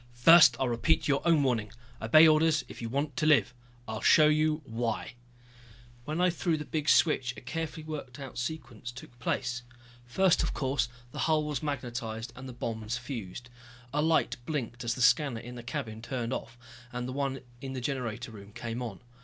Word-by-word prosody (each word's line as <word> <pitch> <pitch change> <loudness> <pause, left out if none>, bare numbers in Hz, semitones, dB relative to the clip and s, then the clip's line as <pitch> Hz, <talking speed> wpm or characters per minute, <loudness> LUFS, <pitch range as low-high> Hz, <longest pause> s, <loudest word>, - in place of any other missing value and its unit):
"First 140 0 +8
I'll 130 - +1
repeat 120 +7 +1
your 140 -1 +2
own 160 -4 +5
warning 115 -6 0 0.3
obey 155 +9 +7
orders 155 0 +3
if - - -10
you 115 - -4
want 140 +2 -2
to 155 - +1
live. 140 -5 +4 0.3
I'll 110 0 -4
show 155 - +6
you 155 0 +2
why 115 -1 -3 0.5
" 120 0 -23
When 155 +3 -3
I 180 0 +4
threw 170 -1 0
the 150 - -6
big 155 0 -1
switch 130 -6 +3
a - - -8
carefully 160 +4 -4
worked 145 -5 -7
out 135 -3 -7
sequence 120 -4 -5
took 120 0 -13
place. 125 0 -1 0.5
First, 185 +8 +3
of - - -2
course, 130 -3 0 0.2
the - - -7
hull 155 -1 +3
was 150 -2 -3
magnetized 120 -6 -4
and 130 +1 -8
the - - -8
bombs 115 -1 -3
fused. 120 -2 -7 0.4
A 150 - +2
light 160 +1 +2
blinked 120 -6 -3
as 120 0 -1
the 125 - 0
scanner 135 -1 +3
in 120 +2 -9
the 120 - -7
cabin 110 -2 -5
turned 120 0 -3
off, 120 0 -6 0.3
and 125 0 -4
the 130 - -5
one 135 -1 -2 0.2
in 135 -1 -5
the 130 - -3
generator 125 -2 -3
room 100 -1 -12
came 120 0 -5
on. 115 -4 -6
125 Hz, 195 wpm, -29 LUFS, 120-150 Hz, 0.5 s, First